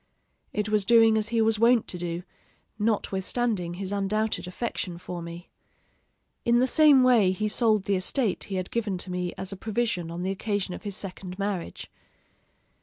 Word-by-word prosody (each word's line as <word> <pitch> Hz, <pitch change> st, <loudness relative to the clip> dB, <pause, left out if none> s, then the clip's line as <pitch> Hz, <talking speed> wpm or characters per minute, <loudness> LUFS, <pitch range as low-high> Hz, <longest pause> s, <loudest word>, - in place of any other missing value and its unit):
It 210 Hz, 0 st, -1 dB
was 215 Hz, -1 st, +2 dB
doing 225 Hz, +1 st, +5 dB
as 215 Hz, -1 st, +1 dB
he 230 Hz, 0 st, +1 dB
was 220 Hz, -1 st, +2 dB
wont 235 Hz, 0 st, +4 dB
to 180 Hz, -, -4 dB
do, 175 Hz, 0 st, -4 dB, 0.6 s
notwithstanding 205 Hz, -2 st, -1 dB
his 190 Hz, +1 st, -5 dB
undoubted 205 Hz, 0 st, -1 dB
affection 180 Hz, -3 st, -4 dB
for 175 Hz, 0 st, -7 dB
me. 170 Hz, +1 st, -9 dB, 0.9 s
In 235 Hz, 0 st, +3 dB
the 250 Hz, -, +4 dB
same 285 Hz, -1 st, +6 dB
way 235 Hz, -7 st, +5 dB
he 215 Hz, +3 st, -1 dB
sold 215 Hz, -2 st, +2 dB
the 200 Hz, 0 st, +1 dB
estate 205 Hz, +3 st, -1 dB
he 195 Hz, -, -5 dB
had 185 Hz, -1 st, -3 dB
given 210 Hz, -5 st, -1 dB
to 180 Hz, +1 st, -5 dB
me 180 Hz, -1 st, -2 dB
as 190 Hz, 0 st, -5 dB
a -, -, -5 dB
provision 205 Hz, -4 st, -2 dB
on 170 Hz, +1 st, -5 dB
the 190 Hz, -, -1 dB
occasion 200 Hz, -1 st, -2 dB
of -, -, -7 dB
his 205 Hz, -2 st, -5 dB
second 185 Hz, -1 st, -7 dB
marriage. 200 Hz, -3 st, -4 dB
200 Hz, 180 wpm, -26 LUFS, 185-225 Hz, 0.9 s, same